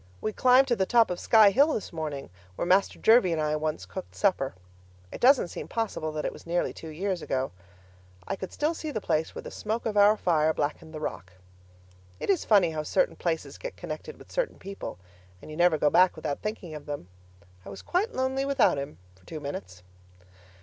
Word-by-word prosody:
We 215 - -3
climbed 255 +3 +5
to 240 - +3
the 190 -3 0
top 235 -5 +4
of 180 - -3
'Sky 215 -3 +6
Hill' 285 +8 +4
this 205 - -5
morning 150 - -5 0.2
where - - -2
Master 190 +3 +3
Jervie 220 -6 +5
and 160 - -1
I 150 0 0
once 155 0 -2
cooked 190 - -8
supper 160 - +1 0.6
it - - -8
doesn't 255 -7 +5
seem - - -7
possible 210 -9 -2
that 155 -1 -3
it - - -2
was - - -14
nearly 175 +1 0
two 160 - -10
years 180 +3 -3
ago. 130 -2 -2 0.8
I - - -1
could 190 -2 -7
still 305 +3 0
see 315 -1 -5
the 255 - -2
place 160 -5 -1
where - - -6
the - - -8
smoke 220 +2 -3
of 220 -2 -1
our 205 +1 +6
fire 160 -4 +2
blackened 155 +2 -3
the 155 - -7
rock. 90 - -5 0.9
It - - +1
is 375 - 0
funny 195 -6 +4
how 155 -1 -2
certain - - +1
places - - -3
get - - -7
connected - - -7
with - - -16
certain - - -1
people, 195 - -7 0.4
and 155 - -11
you - - -7
never 175 -2 +4
go 150 0 +2
back 185 0 +5
without 145 -2 -3
thinking 210 -6 -5
of 150 -1 -9
them. 145 -11 -5 0.6
I - - -10
was 100 - -9
quite 405 +7 0
lonely 260 +1 -1
without 275 - +3
him 140 - -6 0.2
for 95 - -25
two 155 - -6
minutes. 90 -11 -7
180 Hz, 210 wpm, -27 LUFS, 155-230 Hz, 0.9 s, Sky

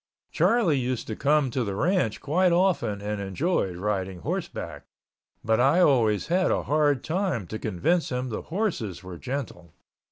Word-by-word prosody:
Charlie 190 - +3
used 125 -1 -2
to 110 - -3
come 145 0 +2
to 125 +1 -1
the 100 -3 -3
ranch 170 - 0
quite 175 +5 +2
often 170 - +1
and 105 0 -3
enjoyed 95 - -1
riding 95 -1 -3
horseback, - - -5 0.6
but 110 0 +2
I 135 +8 +4
always 115 - +3
had 180 +2 +2
a - - +1
hard 145 -3 +2
time 175 - -1
to 110 +5 -6
convince 135 - 0
him 125 0 -2
the 110 - -4
horses 160 - -3
were 90 -2 -9
gentle. 120 - -6
125 Hz, 160 wpm, -26 LUFS, 105-165 Hz, 0.6 s, I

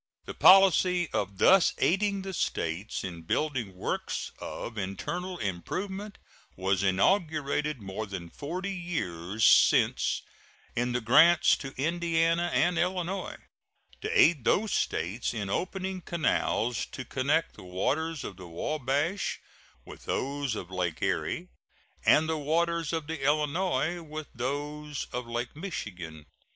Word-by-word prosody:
The - - -6
policy 185 -2 +6
of 100 -1 -2
thus 190 - +5
aiding 195 +2 +1
the 190 0 -5
States 90 - -2
in 85 -3 -6
building 120 - -1
works 90 - -3
of 115 - -6
internal 170 - -4
improvement 190 - -4 0.4
was 95 0 0
inaugurated 150 - +1
more 100 +3 -5
than 90 -4 -7
forty 180 +7 -4
years 110 - -2
since - - +4 0.5
in 120 +1 0
the 125 - 0
grants 160 +9 +6
to 135 -2 -8
Indiana 165 +2 +1
and 175 -1 +2
Illinois, 180 +1 -2 0.6
to 440 +3 0
aid 155 -8 +5
those 210 - +2
States 100 +9 -1
in 100 -3 -3
opening 190 - -2
canals 125 -8 0
to 130 - -7
connect 145 +5 0
the - - -13
waters 145 - -1
of 95 - -7
the 90 -2 -10
Wabash 145 - -1 0.5
with - - -12
those 140 -3 -2
of 95 -3 -7
Lake 90 -4 -2
Erie - - -1 0.5
and 155 +1 +5
the 160 -1 -1
waters 165 +1 0
of 160 -2 -2
the 160 -2 -5
Illinois 155 +2 +1
with 155 -1 -7
those 145 +3 -4
of 125 -1 -3
Lake 120 +2 -4
Michigan. 90 - -6
150 Hz, 130 wpm, -29 LUFS, 105-175 Hz, 0.6 s, policy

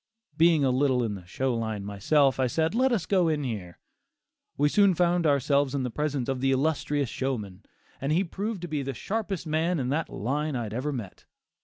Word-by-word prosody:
Being 160 -2 +4
a 130 - +3
little 130 -1 +2
in 110 -3 -2
the 90 -3 -9
"show 130 +6 -1
line" 110 -3 -3
myself, 135 +8 +2
I 130 - +3
said 160 +7 0
"let 255 +3 +2
us 215 -9 0
go 185 -4 +2
in 155 -2 0
here." 100 -9 -5 0.8
We 145 - +3
soon 200 +3 +4
found 175 -1 +2
ourselves 140 0 +2
in 135 - -1
the 125 - -3
presence 145 -1 -2
of 135 -2 -2
the 135 - +2
illustrious 145 0 0
showman, 110 -9 -4 0.4
and 135 +2 -1
he 175 +5 +3
proved 195 +2 -4
to - - -3
be 150 -3 -2
the 135 -1 -4
sharpest 200 - -3
man 160 +2 0
in 125 -1 -1
that 155 +4 -1
line 145 +6 -2
I 120 - -1
had 105 -1 -6
ever 130 +6 -2
met. 115 -9 -7
140 Hz, 210 wpm, -27 LUFS, 125-160 Hz, 0.8 s, Being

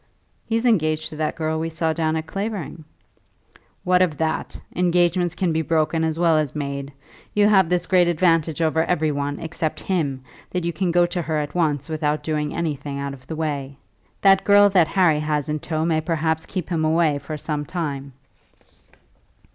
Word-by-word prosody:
"He's 230 +1 0
engaged 155 -9 +2
to - - -9
that 155 0 -1
girl 160 -1 -1
we 165 +1 -2
saw 160 0 0
down 160 -1 0
at 160 0 -2
Clavering." 195 -5 -5 1.0
"What 180 0 +3
matters 175 -5 +2
that? 160 -1 -2 0.2
Engagements 175 0 +2
can 180 -4 0
be 160 - +1
broken 160 0 +1
as 160 0 -1
well 165 -2 +3
as 150 -3 -2
made. 140 -1 -4 0.4
You 205 0 +5
have 190 -5 +4
this 180 0 +1
great 180 -2 +4
advantage 165 -2 +2
over 160 0 +2
every 160 -3 +1
one, 145 0 -3
except 160 -1 -3
him, 145 -9 -1 0.3
that 180 -1 -2
you 170 - -1
can 185 +3 -1
go 175 +1 +4
to 175 0 -2
her 160 -1 -2
at 150 -1 -3
once 150 -5 0
without 155 -2 -1
doing 150 -1 -1
anything 145 -4 -3
out 140 0 -4
of 130 -2 -14
the 160 - -5
way. 140 -4 -3 0.4
That 195 -1 +5
girl 205 0 +6
that 180 -5 +4
Harry 165 -3 +3
has 150 -1 -1
in 150 0 -1
tow 155 +1 -2
may 160 -2 +1
perhaps 160 0 -1
keep 185 -1 -4
him 165 -3 0
away 155 -2 +2
for 155 +1 -6
some 150 0 -3
time." 140 -4 -4
160 Hz, 185 wpm, -22 LUFS, 150-175 Hz, 1.0 s, girl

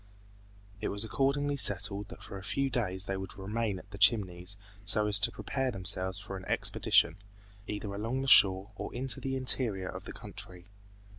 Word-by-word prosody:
It - - -2
was 100 +1 +2
accordingly 140 +4 0
settled 100 -3 +2
that - - -12
for 100 - -8
a - - -13
few 135 +5 -1
days 95 -6 -1
they 95 - -3
would 95 0 -8
remain 105 +1 -3
at 100 +2 -14
the 100 - -10
Chimneys 100 -3 +3 0.3
so 105 0 +4
as 105 -1 +3
to 105 - +2
prepare 135 -1 -3
themselves 95 -2 +1
for 100 0 -7
an 95 - -10
expedition, 80 +5 +2 0.5
either 105 -1 -5
along 115 +6 -3
the - - -4
shore 95 -3 +6
or - - -6
into 130 +1 +3
the 135 0 -3
interior 120 -7 +1
of - - -8
the - - -7
country. 90 -1 -7
100 Hz, 180 wpm, -30 LUFS, 95-120 Hz, 0.5 s, shore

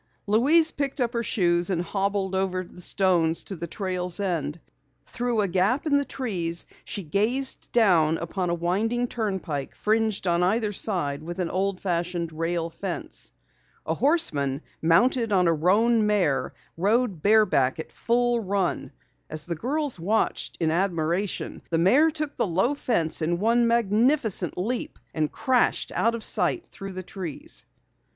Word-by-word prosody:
Louise 290 +10 +4
picked 280 0 -3
up 245 -1 0
her 235 - 0
shoes 175 -5 +1
and 175 -2 0
hobbled 195 +1 -1
over 190 -1 -1
the 180 0 -11
stones 175 -4 +1
to 195 - -5
the 170 0 -6
trail's 180 -1 -2
end. 170 -5 -2 0.5
Through 240 -2 -1
a 200 - +1
gap 195 - +1
in 295 -2 +2
the 285 - 0
trees 175 -12 -2 0.2
she 200 - -5
gazed 220 - -1
down 170 -9 +4
upon 175 +2 -3
a - - +1
winding 215 +8 0
turnpike 190 - -3
fringed 220 -2 0
on 175 -1 +2
either 210 +3 +1
side 155 -9 0
with 170 +2 -7
an 180 -3 -2
old 190 0 -1
fashioned 175 -2 -2
rail 165 +1 -1
fence. 185 0 -6 0.5
A - - 0
horseman, 150 - +1 0.2
mounted 230 +8 +3
on 185 -3 +3
a 165 - +4
roan 210 +7 +3
mare, 180 -10 +1 0.3
rode 205 -1 +1
bareback 200 -11 +3
at 160 - -7
a - - -24
full 240 0 +1
run. 195 -3 -2 0.4
As 155 -1 -3
the 175 - -3
girls 275 - -2
watched 210 +7 0
in 160 -2 +1
admiration, 175 +1 -1
the 165 - +1
mare 255 - +5
took 305 -2 -3
the - - 0
low 190 - +1
fence 175 - -1
in 170 +2 0
one 230 +4 +2
magnificent 230 - +2
leap 230 +7 -3 0.2
and 155 -2 -1
crashed 255 -2 +1
out 230 +1 +1
of 230 - -6
sight 350 - +2
through 195 -1 -9
the 185 0 -6
trees. 180 -4 -5
195 Hz, 160 wpm, -25 LUFS, 170-230 Hz, 0.5 s, mare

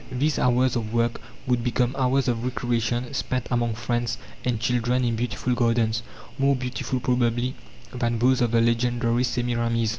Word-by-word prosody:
These 140 +4 0
hours 125 +1 +3
of 115 -1 -3
work 115 0 +1 0.2
would 125 -2 +1
become 125 +1 0
hours 135 0 +1
of 120 -1 0
recreation 120 0 -1
spent 130 -2 -2
among 120 -2 +1
friends 120 0 -1 0.3
and 125 -3 0
children 125 +1 +1
in 115 -1 0
beautiful 120 +2 -1
gardens, 115 -2 +1 0.4
more 140 0 +4
beautiful 125 0 -3
probably 125 0 +1 0.4
than 120 -2 0
those 125 +2 +3
of 120 - +3
the 115 0 +3
legendary 120 +1 +1
Semiramis. 120 -2 0
120 Hz, 155 wpm, -25 LUFS, 115-125 Hz, 0.4 s, more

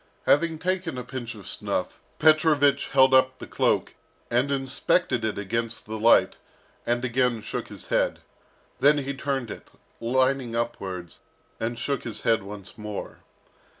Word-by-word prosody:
Having 165 +2 +3
taken 180 -3 -2
a 125 - -4
pinch 125 -1 -6
of 100 -3 -12
snuff, - - -3 0.2
Petrovich 150 -3 +4
held 130 -1 +5
up 130 0 +4
the - - -8
cloak, - - 0 0.4
and 125 +4 +2
inspected 135 -1 0
it 110 -1 -1
against 115 +3 -3
the 110 0 -5
light, 115 +2 +5 0.5
and 120 +1 +1
again 125 -1 +1
shook - - -5
his - - -9
head. - - +1 0.6
Then 145 +1 +5
he 140 -1 -2
turned 135 -4 -3
it, - - -9 0.3
lining 130 0 +1
upwards, 95 -7 -4 0.4
and 115 +1 -2
shook 140 +3 -2
his 115 -3 -6
head 115 -1 +2
once 100 0 -10
more. 105 -1 -6
125 Hz, 150 wpm, -26 LUFS, 115-140 Hz, 0.6 s, held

